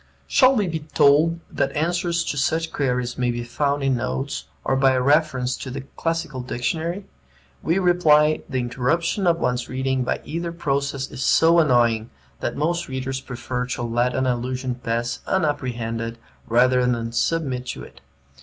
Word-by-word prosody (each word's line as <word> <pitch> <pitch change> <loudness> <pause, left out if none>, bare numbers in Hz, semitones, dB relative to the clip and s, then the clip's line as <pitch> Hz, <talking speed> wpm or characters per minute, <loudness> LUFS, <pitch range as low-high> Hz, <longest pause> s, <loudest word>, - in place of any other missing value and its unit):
Shall 260 0 +5
we 210 -4 +2
be 165 -2 -2
told 155 +2 +3
that - - 0
answers 170 +2 0
to - - -3
such 160 +3 0
queries 125 -3 -1
may 125 -1 +1
be 120 0 -2
found 140 +3 -1
in 135 -2 +2
notes, 65 - -3 0.2
or 135 - +1
by 135 0 +4
a 130 - +2
reference 135 -2 +2
to 130 - -7
the 135 +2 -5
Classical 165 -5 -2
Dictionary? 160 +10 -3 0.6
We 165 - +1
reply, 155 -5 +4
the 130 - -2
interruption 165 - 0
of 170 -1 +4
one's 125 -6 -1
reading 130 0 -1
by - - -2
either 170 +3 -3
process 140 -4 -2
is - - -7
so 165 +4 +5
annoying 120 -6 +3 0.3
that - - -3
most 170 +4 0
readers 130 0 -3
prefer 125 0 -4
to 125 - -3
let 120 +2 0
an 130 - +1
allusion 125 +1 -1
pass 120 -1 -2
unapprehended 115 -9 -1 0.3
rather 125 +2 +4
than 120 -2 0
submit 130 -1 -1
to - - -5
it. - - -14
135 Hz, 165 wpm, -23 LUFS, 125-160 Hz, 0.6 s, Shall